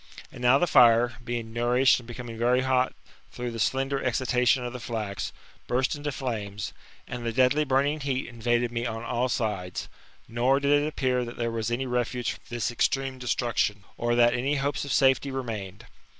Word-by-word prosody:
And - - -11
now 125 +2 +5
the 175 - +2
fire, 120 -5 +5
being 120 -2 -4
nourished 125 +3 +3
and 120 - -13
becoming 120 -1 -7
very 120 +3 +2
hot 130 -1 +1 0.4
through 120 0 -4
the 115 - -6
slender 135 +4 0
excitation 125 0 +2
of 120 - -5
the 125 - -6
flax, 110 -4 -4 0.4
burst 130 +3 +1
into 145 0 -4
flames, 105 -6 -4 0.3
and 125 -1 -6
the 115 - -1
deadly 130 +5 +3
burning 140 +3 +1
heat 135 -2 -2
in 120 -2 -12
vaded 120 +1 +1
me 120 +1 -2
on 115 0 -5
ail 125 +2 -1
sides; 105 -8 -2 0.4
nor 125 +4 +2
did 145 +1 +3
it 150 - -1
appear 130 -4 0
that 120 0 -8
there 115 -1 -1
was 115 0 -2
any 120 +3 -1
refuge 125 -1 -1
from - - -10
this 120 -1 -2
extreme 130 +2 0
destruction, 120 -4 0
or 120 0 0
that 120 0 +5
any 130 +4 0
hopes 140 0 -1
of 140 - -5
safety 135 0 +3
remained. 115 -5 -5
125 Hz, 190 wpm, -27 LUFS, 115-130 Hz, 0.4 s, now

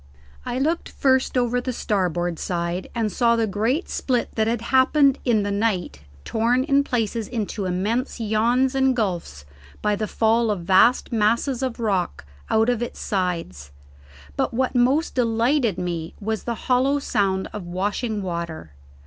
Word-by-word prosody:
I 245 - -2
looked 320 +6 0
first 265 -1 +1
over 245 0 +1
the 255 - -3
starboard 175 -6 -1
side 175 +1 -3
and 225 -3 0
saw 235 +4 +3
the 230 -1 +1
great 225 - -1
split 250 -3 -1
that 220 -1 +1
had 230 0 0
happened 275 +1 +4
in 225 -5 +2
the 205 - -2
night 200 - -1 0.2
torn 235 +3 +1
in 280 0 +3
places 230 -4 -2
into 215 -4 -3
immense 210 +9 -1
yawns 235 +4 +2
and 265 -1 +2
gulfs 175 - -3 0.3
by 210 0 +1
the 215 +1 -3
fall 225 +2 +2
of 205 -4 -1
vast 190 +10 +4
masses 235 +4 +1
of 255 -3 -3
rock 195 - -1 0.2
out 220 +1 +3
of 245 -2 +1
its 240 - -5
sides; 165 - -3 0.6
but - - -1
what 260 +1 0
most 260 +6 +2
delighted 235 - +1
me 170 -2 -4
was 220 +1 -3
the 235 - -2
hollow 260 +3 +3
sound 195 -8 0
of 200 -4 -6
washing 205 +4 -2
water. 170 - -5
225 Hz, 155 wpm, -23 LUFS, 190-250 Hz, 0.6 s, happened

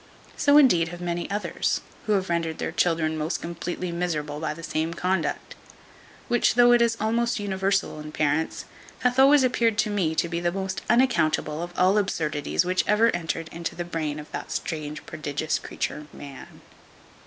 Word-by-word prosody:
So 285 0 +5
indeed 180 - +5
have 175 +1 -8
many 175 -1 -3
others, 205 +1 -1 0.3
who 215 - +3
have 190 -2 +1
rendered 165 -2 -1
their - - -3
children 160 -2 +1
most 155 +3 -1
completely 170 +1 -4
miserable 155 -4 -2
by 155 -1 -3
the 165 - -10
same 160 +1 -2
conduct; 180 -1 -1 0.7
which, 240 -2 +2
though 245 0 +6
it 240 0 +5
is 230 -1 +2
almost 230 +2 0
universal 195 -3 -1
in 150 0 -8
parents, 150 +1 -1 0.4
hath 250 +1 +2
always 275 +1 +7
appeared 235 -3 +2
to 215 - +1
me 175 -6 0
to 170 - +1
be 170 0 -3
the 175 0 0
most 190 +1 -3
unaccountable 170 - +2
of 175 0 -5
all 185 +1 +4
the 210 - +4
absurdities 155 -3 -1
which 185 0 +1
ever 215 0 +4
entered 165 -1 -3
into 170 +1 -5
the 175 - -4
brain 155 -3 -3
of 150 - -11
that - - -6
strange 155 -3 -4
prodigious 155 0 -2
creature 150 0 -4
man. 140 -2 -11
175 Hz, 175 wpm, -25 LUFS, 155-210 Hz, 0.7 s, always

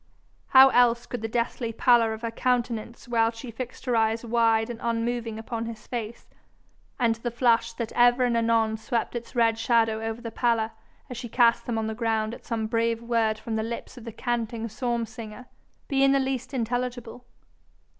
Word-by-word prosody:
How 265 0 +8
else 240 -1 +3
could 245 -2 -5
the 225 - -2
deathly 235 0 -2
pallor 230 0 +4
of 220 +1 -6
her 230 - -2
countenance 235 -1 -2
while 230 -1 +2
she 230 +1 -8
fixed 250 +3 -7
her 250 -2 +1
eyes 225 +1 +1
wide 225 0 +2
and 230 - -8
unmoving 230 -1 -2
upon 225 0 -4
his 225 -2 -8
face, 235 -2 -5 0.7
and 235 -2 +2
the 240 +1 -3
flush 235 -1 +2
that 230 -1 -4
ever 245 +1 +4
and 240 -1 +1
anon 225 -1 +2
swept 230 +2 -2
its 240 +2 -6
red 230 -1 +3
shadow 225 -1 +2
over 225 +1 -4
the 235 -1 -7
pallor 225 -1 +1 0.4
as 250 - -7
she 240 -1 -6
cast 235 0 +3
them 235 -2 -1
on 220 - -1
the 220 - -2
ground 220 -1 -1
at - - -12
some 225 -2 -1
brave 230 +1 0
word 230 -2 +1
from 220 0 -4
the - - 0
lips 230 +3 -6
of 245 - -11
the 230 - -7
canting 230 0 -3
psalm 235 +1 -2
singer, 225 +1 -10 0.4
be 275 -1 +2
in 275 0 +5
the 275 - +3
least 265 -1 -2
intelligible? 245 -1 -3
230 Hz, 195 wpm, -26 LUFS, 225-245 Hz, 0.7 s, How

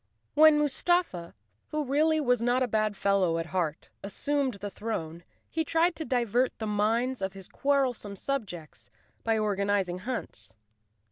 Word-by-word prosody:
When 310 0 +7
Mustafa, 295 - 0 0.3
who 305 -1 -2
really 310 +4 +2
was 250 -5 +2
not 245 +2 +2
a - - 0
bad 215 -2 0
fellow 190 -4 +2
at 165 - -2
heart, 170 -4 -2
assumed 270 +6 -1
the 200 0 -6
throne 170 -7 -4 0.2
he 320 - -1
tried 330 +2 +2
to 320 - -4
divert 245 -1 +1
the 220 - -4
minds 225 +4 0
of 190 0 -2
his 195 -1 -10
quarrelsome 260 -7 0
subjects 180 - -5 0.3
by 225 -1 +2
organizing 200 -3 0
hunts. 110 - -6
225 Hz, 145 wpm, -28 LUFS, 195-275 Hz, 0.3 s, When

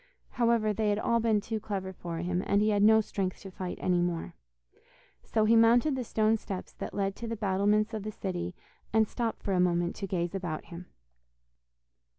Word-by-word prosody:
However, 230 -3 +2
they 215 0 0
had 205 - +1
all 235 +2 +1
been 225 -2 +2
too 220 +1 -3
clever 195 -3 -4
for 170 -2 -6
him, 180 +1 -1
and 200 - +3
he 215 +1 +3
had 205 -1 +2
no 220 +1 +6
strength 195 -3 -3
to 195 - -9
fight 185 -1 -5
any 180 -1 +1
more. 175 -1 -2 0.9
So 220 -1 +1
he 225 +2 +5
mounted 235 +5 +5
the 255 - -2
stone 220 -1 +2
steps 195 -3 -7
that - - -7
led 195 -1 -1
to 235 - -5
the 230 - -3
battlements 210 +1 +1
of 215 - -3
the 215 +2 -5
city, 180 -3 -4 0.4
and 220 0 +3
stopped 230 0 -3
for 195 - -1
a 185 - +2
moment 175 -1 +1
to 195 - -4
gaze 175 -1 -2
about 175 -5 -4
him. 175 0 -10
205 Hz, 200 wpm, -29 LUFS, 185-220 Hz, 0.9 s, no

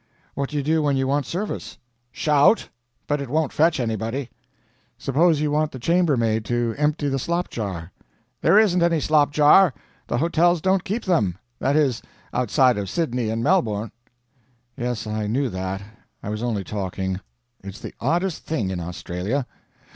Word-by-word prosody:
"What 140 -1 -3
do 150 - -4
you 145 - 0
do 160 +2 +2
when 145 -2 +1
you 135 - +1
want 140 -1 0
service?" 200 +5 -4 0.3
"Shout. 150 - +3 0.4
But 145 -1 -1
it 140 - -5
won't 155 +1 0
fetch 160 -1 +3
anybody." 115 +2 -2 0.7
"Suppose 155 +3 +2
you 150 -1 0
want 150 +1 +1
the - - -7
chambermaid 125 -7 +2
to 120 -1 0
empty 150 0 0
the 135 -1 0
slopjar?" 105 - -3 0.5
"There 200 - +5
isn't 190 -5 +4
any 170 -1 +3
slop 150 0 +3
jar. 150 +2 +6 0.3
The - - -1
hotels 170 +3 +3
don't 190 +2 +1
keep 210 +4 -3
them. 105 - +1 0.2
That 140 +2 +1
is, 140 -7 +2 0.3
outside 125 -1 +3
of 100 -2 -4
Sydney 125 - -1
and 115 +1 -2
Melbourne." 110 - +1 0.8
"Yes, 120 -4 -3
I 110 -1 -2
knew 130 +5 0
that. 95 0 -4 0.4
I - - -4
was 105 +1 -3
only 115 -5 -1
talking. 95 -2 -3 0.4
It's 100 +1 -8
the - - -8
oddest 170 +6 0
thing 115 -12 -1
in 90 - -3
Australia. 90 +8 -3
135 Hz, 160 wpm, -23 LUFS, 110-155 Hz, 0.8 s, jar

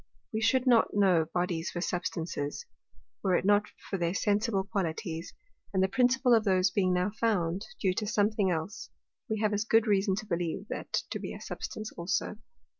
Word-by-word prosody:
We 220 - -1
should 255 +3 +3
not 235 -5 +4
know 185 -6 +4
Bodies 175 -1 -1
for 175 - -5
Substances, 165 -4 -3 0.6
were 185 - +2
it 180 - 0
not 205 +1 +4 0.2
for 195 - -3
their 170 +1 0
sensible 205 -1 +1
Qualities; 170 -4 -3 0.4
and 190 - +4
the - - +4
principal 250 +3 +3
of 225 -2 +5
those 190 -2 +3
being 185 -1 +2
now 180 +3 +1
found 200 -5 0
due 190 -3 +2
to 210 +3 -2
something 205 -2 +2
else, 175 +4 -3 0.4
we 220 -1 -1
have 215 -1 +2
as 205 +1 +1
good 225 +1 +3
reason 195 -2 +2
to 215 +2 -5
believe 170 -4 -2
that - - -5 0.2
to - - -2
be - - -6
a - - -9
Substance 215 0 -6
also. 175 +4 -2
195 Hz, 185 wpm, -30 LUFS, 180-215 Hz, 0.6 s, of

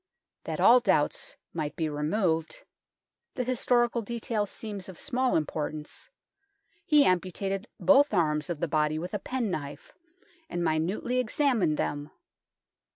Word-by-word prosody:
That - - -4
all 250 +2 +7
doubts 190 -10 0 0.2
might 150 -3 -3
be 160 - -1
removed 160 +2 -1 0.7
the 250 - -1
historical 240 -1 +1
detail 225 -1 -2
seems 205 -2 -7
of 185 - -10
small 260 -2 0
im 155 - +2
portance 150 0 -5 0.8
he 300 -5 +6
amputated 195 +3 0
both 285 0 +5
arms 150 -3 +1
of 170 -4 -4
the 170 - +1
body 155 0 +1
with 175 +5 -5
a 210 - -1
penknife, 190 - -4 0.6
and 175 - -2
minutely 170 +10 0
examined 245 - +1
them. 145 0 -2
190 Hz, 130 wpm, -28 LUFS, 155-240 Hz, 0.8 s, all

